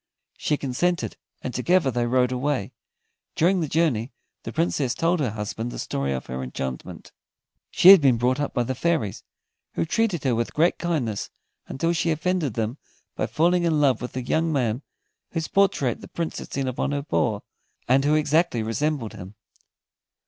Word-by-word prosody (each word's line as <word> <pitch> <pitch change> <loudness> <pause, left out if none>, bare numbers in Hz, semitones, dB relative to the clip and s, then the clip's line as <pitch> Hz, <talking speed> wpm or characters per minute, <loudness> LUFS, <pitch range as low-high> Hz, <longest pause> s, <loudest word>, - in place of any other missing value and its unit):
She 150 - 0
consented, 170 +7 -1 0.3
and 130 - -4
together 160 +2 +2
they 120 0 0
rode 125 +1 +2
away. 130 -3 -1 0.6
During 180 +4 +3
the 160 - -1
journey, 140 -7 +1 0.3
the - - -6
Princess 120 +10 0
told 170 +1 +1
her 135 -5 +1
husband 110 +2 -4
the - - -7
story 70 0 -2
of 65 -1 -3
her 65 +1 -5
enchantment. 65 0 -6 0.6
She 180 - +6
had 195 -3 +11
been 130 -4 +4
brought 125 +4 +1
up 145 - -1
by 120 - 0
the 130 - -2
fairies, 130 - -1 0.5
who - - 0
treated 205 -2 0
her 130 -3 +2
with 115 0 -2
great 165 +3 +2
kindness 140 - -2 0.4
until 165 +6 -1
she 170 0 0
offended 160 - 0
them 115 +4 -2 0.4
by - - -1
falling 175 +3 +2
in 160 -3 +2
love 135 -6 +3
with 125 - -5
the 130 - -3
young 160 +6 +1
man 125 -4 0 0.5
whose 165 -2 -2
portrait 170 - +1
the - - -10
Prince 170 -1 -4
had - - -9
seen 135 -1 -2
upon 130 +3 -1
her 140 0 -2
paw, 85 - 0 0.5
and 130 +2 +4
who 150 +2 +3
exactly 155 -5 +2
resembled 125 +1 -1
him. 95 +3 -10
135 Hz, 180 wpm, -24 LUFS, 120-165 Hz, 0.6 s, had